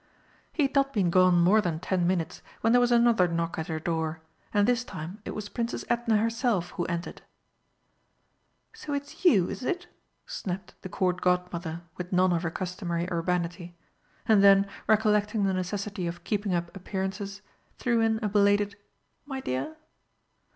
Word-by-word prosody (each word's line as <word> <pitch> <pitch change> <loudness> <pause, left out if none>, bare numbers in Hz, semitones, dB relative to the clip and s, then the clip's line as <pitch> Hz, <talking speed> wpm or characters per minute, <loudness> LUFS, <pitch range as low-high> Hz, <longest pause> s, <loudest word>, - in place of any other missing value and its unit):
He 305 - +1
had 275 - 0
not 275 -1 +2
been 190 -6 +2
gone 185 0 +5
more 190 +6 +5
than 170 -5 -2
ten 180 0 0
minutes 175 -3 -1 0.2
when 225 +1 +3
there 245 - +6
was 245 0 +2
another 235 -6 +5
knock 170 -1 -2
at 160 - -3
her 160 -2 -2
door, 160 -1 -2 0.3
and 205 0 +3
this 245 0 +2
time 180 0 -8
it - - -5
was 210 -1 -5
Princess 235 +2 -3
Edna 235 -2 +2
herself 225 -4 0
who 175 - -3
entered. 170 0 -4 1.5
"So 375 -10 -6
it's 285 +4 -5
you, 205 - +5
is - - -6
it?" 355 +6 -2 0.4
snapped 185 0 -5
the 185 - -7
Court 180 -1 0
Godmother, 175 -2 -1
with 180 0 -6
none 185 0 +3
of 170 - 0
her 170 - -1
customary 175 -1 -3
urbanity. 175 0 -2 0.5
And 210 -3 +5
then, 195 0 +7 0.2
recollecting 210 -1 +3
the 195 -1 +2
necessity 190 0 -3
of 170 0 -6
keeping 205 -2 -1
up 170 +2 -3
appearances, 195 +1 -4 0.3
threw 235 -2 +1
in 225 0 +2
a - - +2
belated 205 0 +3 0.5
"my 270 -2 -4
dear." 260 - -3
190 Hz, 165 wpm, -28 LUFS, 175-220 Hz, 1.5 s, then